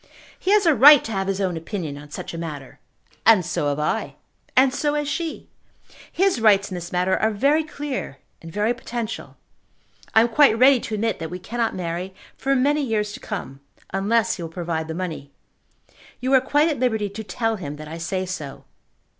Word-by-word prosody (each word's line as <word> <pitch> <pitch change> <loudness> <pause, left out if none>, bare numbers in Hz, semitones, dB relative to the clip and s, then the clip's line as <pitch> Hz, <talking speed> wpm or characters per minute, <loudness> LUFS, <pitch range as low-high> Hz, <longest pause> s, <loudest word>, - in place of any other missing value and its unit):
"He 370 - -3
has 420 -2 +4
a 325 - +5
right 285 +3 +8
to 225 - -6
have 195 -2 -2
his 195 0 -1
own 185 -3 -1
opinion 165 -2 -5
on 145 +1 -11
such - - -7
a - - -5
matter." 150 -5 -7 0.4
"And 215 -5 +5
so 155 -3 -1
have 140 - -1
I. 150 0 -2 0.4
And 260 0 +5
so 295 +2 0
has 295 -1 -1
she. 320 +2 -4 0.6
His 375 -9 +1
rights 200 -2 +4
in - - -4
this 175 -1 -6
matter 180 +1 +1
are 220 - +2
very 280 +9 +2
clear 290 - -5 0.2
and 165 - -10
very 210 +6 +1
potential. 235 -2 -6 0.8
I 220 - +8
am 230 - +3
quite 270 -2 +5
ready 260 +1 +6
to 220 - -4
admit 225 +2 -1
that 165 -1 -5
we 180 - -5
cannot 230 +5 -2
marry 180 +1 -4 0.2
for 275 0 0
many 290 +3 +2
years 215 -5 -1
to - - -8
come, 155 -10 -6 0.3
unless 220 +4 +1
he - - -7
will 165 - -5
provide 165 -2 -3
the 160 - -5
money. 165 -6 -5 0.9
You 260 +2 -1
are 260 - +6
quite 290 +4 +2
at 300 -6 -1
liberty 220 -5 +1
to 210 +3 -7
tell 225 +1 -2
him 150 -6 -6
that 155 +1 -9
I 165 +2 -7
say 185 +3 -2
so. 155 -7 -6
210 Hz, 205 wpm, -23 LUFS, 170-255 Hz, 0.9 s, right